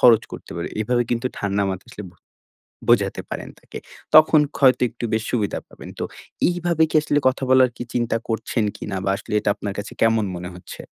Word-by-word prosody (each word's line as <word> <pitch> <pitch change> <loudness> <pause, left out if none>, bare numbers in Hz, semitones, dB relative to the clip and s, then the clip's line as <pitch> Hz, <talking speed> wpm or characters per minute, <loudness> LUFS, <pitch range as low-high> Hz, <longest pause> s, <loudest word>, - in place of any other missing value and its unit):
খরচ 115 -3 +7
করতে - - -9
পারি। 85 - -3
এভাবে 120 +3 +1
কিন্তু 120 +1 0
ঠান্ডা 100 0 0
মাথা 95 0 -4
আসলে 105 - -8
বু - - -24 0.7
বোঝাতে 100 -5 +3
পারেন - - -5
তাকে। - - -10 0.4
তখন 155 0 +8 0.2
হয়তো 130 -2 +4
একটু 120 +1 -8
বেশি 110 0 0
সুবিধা 105 -5 0
পাবেন। - - -12
তো - - -2 0.4
এইভাবে 175 -2 0
কি - - -9
আসলে 145 -1 +1
কথা 130 - -2
বলার 130 -1 +6
কি - - -5
চিন্তা 120 -2 +1
করছেন 115 0 -1
কিনা 100 -2 -5
বা 95 - +1
আসলে 105 - -6
এটা 105 - +1
আপনার 100 -1 -5
কাছে 100 - -5
কেমন 115 -1 +3
মনে 90 0 -6
হচ্ছে? 90 - -10
115 Hz, 195 wpm, -22 LUFS, 100-130 Hz, 0.7 s, তখন